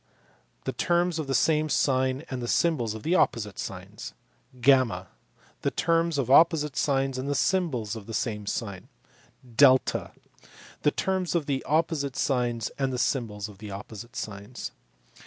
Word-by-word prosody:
the 130 - -2
terms 175 +5 +1
of 155 - -3
the 135 - 0
same 155 -1 +2
sign 130 0 +1
and 130 -1 -3
the 120 - -3
symbols 120 -8 +1
of 110 - -9
opposite 105 - +1
signs; - - -7 0.4
(y) 125 -7 +3 0.6
the - - +1
terms 165 -1 +1
of 130 -2 0
opposite 150 -1 +5
signs 135 -2 +1
and 135 +2 -3
the 145 - 0
symbols 135 - 0
of 110 -3 -9
the 115 - -6
same 105 -4 -2
sign; 100 -4 -4 0.6
(S) 130 +2 +4 0.7
the - - +4
terms 185 +2 -1
of 165 -4 +1 0.2
opposite 155 -3 0
signs 120 -4 0
and 135 -1 +1
the 125 - -2
symbols 110 -6 -1
of 105 -2 -14
opposite 105 +4 -9
signs. 105 +4 -6
130 Hz, 145 wpm, -27 LUFS, 115-150 Hz, 0.7 s, opposite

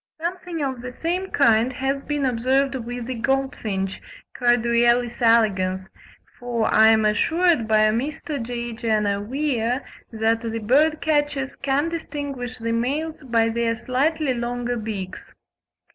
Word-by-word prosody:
Something 345 -1 -4
of 260 -3 -3
the 250 - -6
same 355 +8 -2
kind 230 -2 +3
has 270 +2 -1
been 290 -1 -2
observed 260 +3 +1
with 245 -1 -5
the 260 - -3
goldfinch 230 -6 -2 0.3
(Carduelis 240 0 +2
elegans), 195 -5 +2 0.5
for 240 -2 -1
I 220 0 +7
am 220 -1 +4
assured 320 - +2
by 215 0 +4
Mr. 280 +4 -3
J. 235 0 -4
Jenner 215 -3 0
Weir 255 0 -1 0.3
that 225 0 +1
the 230 -1 -3
bird 290 +8 +2
catchers 290 -3 0
can 280 +3 0
distinguish 285 -6 -5
the 230 -1 -3
males 285 +8 -2
by 230 -4 +1
their 230 0 0
slightly 280 +4 0
longer 245 0 -2
beaks. 210 -5 -6
245 Hz, 130 wpm, -23 LUFS, 225-280 Hz, 0.5 s, I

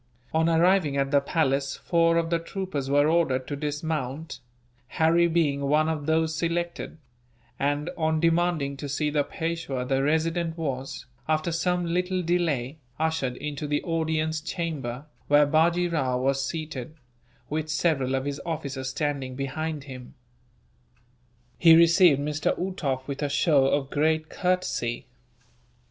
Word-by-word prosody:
On 160 +1 +3
arriving 165 -3 +3
at 135 0 0
the 140 -1 +4
palace 140 -2 0
four 165 -1 +2
of 165 0 0
the 170 - +2
troopers 165 -6 -4
were 145 +1 +4
ordered 155 -6 +1
to 145 - -4
dismount 150 -1 -4 0.5
Harry 165 +4 +3
being 160 -4 +1
one 150 +2 +3
of 155 -2 -2
those 160 0 +2
selected 170 0 -2 0.6
and, 145 +2 0
on 160 -1 0
demanding 165 -4 +1
to 145 0 -6
see 150 +2 -1
the 145 -1 +2
Peishwa 160 -5 -3
the 135 +1 +1
Resident 165 +3 0
was, 135 -4 -4 0.2
after 155 +2 0
some 175 +1 0
little 180 +2 -1
delay, 160 -5 0 0.2
ushered 160 -5 -1
into 150 +1 -4
the 145 0 -1
audience 160 -1 -1
chamber, 150 -6 -4 0.2
where 145 0 +5
Bajee 170 +4 +2
Rao 130 -6 0
was 135 +1 0
seated, 155 -2 -5 0.5
with 155 +1 -3
several 150 -4 +1
of 135 0 -2
his 140 0 -4
officers 140 -5 -4
standing 135 -2 -2
behind 150 +3 -3
him. 130 -2 -10 1.4
He 165 -1 +8
received 170 -2 +6
Mr. 150 +1 -1
Uhtoff 150 -8 -2
with 140 0 -5
a 145 - 0
show 140 -1 +3
of 140 0 0
great 155 +1 +1
courtesy. 180 -10 -1
155 Hz, 140 wpm, -26 LUFS, 140-165 Hz, 1.4 s, He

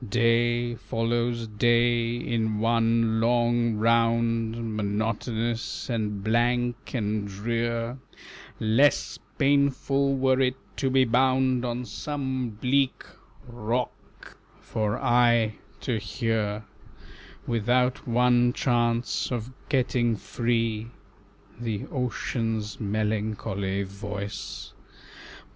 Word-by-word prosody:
Day 120 +1 +2
follows 115 +1 -1
day 120 +1 +2
in 110 -3 -1
one 115 0 +2
long 120 0 +2
round, 115 0 +1
Monotonous 110 +3 -2
and 105 -3 -2
blank 120 +3 0
and 105 -2 -1
drear; 115 +4 -2 0.6
Less 115 +7 +2 0.2
painful 140 -1 +2
were 130 0 +3
it 130 -1 +2 0.2
to 135 - +1
be 130 0 +4
bound 130 +1 +2
On 125 0 -2
some 130 -3 -3
bleak 130 +5 0 0.4
rock, 120 +1 -5 0.2
for 105 -1 -2
aye 120 -3 +3 0.3
to 120 -4 -1
hear 110 -1 -2 0.8
Without 125 +3 +1
one 120 0 +3
chance 120 -1 0
of 120 0 -3 0.2
getting 125 -4 +2
free 115 0 -1 0.7
The 110 -4 -3
ocean's 115 -4 -2
melancholy 105 -2 -1
voice! 100 0 -6
115 Hz, 85 wpm, -26 LUFS, 110-125 Hz, 0.8 s, be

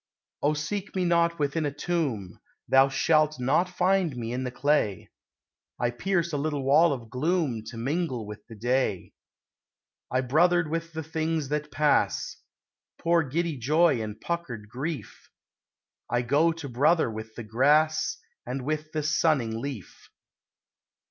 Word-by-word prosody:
Oh 150 +1 +2
seek 190 +8 -4
me 185 -1 +1
not 170 -1 +2
within 150 +1 0
a 145 - 0
tomb; 145 - -2 0.3
Thou 135 +1 +5
shalt 155 +2 +2
not 145 +9 +2
find 180 -5 +1
me 115 0 -4
in 130 +1 -2
the - - -2
clay! 125 -7 0 0.7
I 120 0 +1
pierce 170 +5 -1
a - - +1
little 145 -1 -2
wall 150 +5 +5
of 120 -5 -5
gloom 145 -5 0
To 115 - -8
mingle 130 -1 -2
with 105 0 -9
the 115 - -10
Day! 120 -4 -1 1.0
I 130 - +1
brothered 160 +5 +3
with 165 0 -3
the 160 0 -4
things 160 -2 -2
that 150 0 -2
pass, 150 +2 +1 0.6
Poor 170 0 +3
giddy 160 +2 -2
Joy 150 +1 +3
and 105 -1 -6
puckered 120 -12 -4
Grief; 135 0 -6 0.8
I 120 0 +1
go 145 +7 +3
to 165 -3 -7
brother 140 +2 +2
with 110 0 -8
the 115 - -6
Grass 150 +8 +2 0.3
And 125 +2 -4
with 155 +1 -3
the 155 -1 -1
sunning 145 -7 +1
Leaf. 130 - -8
145 Hz, 150 wpm, -27 LUFS, 125-165 Hz, 1.0 s, Thou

